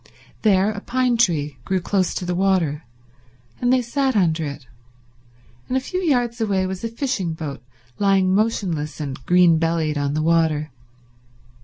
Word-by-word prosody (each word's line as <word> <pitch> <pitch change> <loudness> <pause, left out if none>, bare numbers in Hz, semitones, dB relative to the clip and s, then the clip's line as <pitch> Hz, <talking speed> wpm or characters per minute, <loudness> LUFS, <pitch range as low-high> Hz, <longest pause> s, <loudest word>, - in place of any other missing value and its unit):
There 200 -1 +3
a 205 - -5
pine 255 0 +1
tree 150 - +1
grew 190 -1 0
close 185 +1 0
to 180 - -3
the 180 - -1
water, 175 -5 +1 0.7
and 245 0 +1
they 255 -1 +3
sat 265 +2 0
under 165 -5 +2
it, 140 -2 -8 1.0
and 255 - 0
a - - +3
few 365 +8 -4
yards 245 -9 0
away 195 -4 +1
was 185 +1 -5
a - - 0
fishing 230 - -2
boat 145 -6 -6 0.4
lying 195 -2 +3
motionless 180 -9 -1
and 135 -3 -5
green 175 -2 +5
bellied 160 -2 0
on 145 0 -1
the 155 - 0
water. 160 -2 +1
185 Hz, 160 wpm, -22 LUFS, 160-225 Hz, 1.0 s, green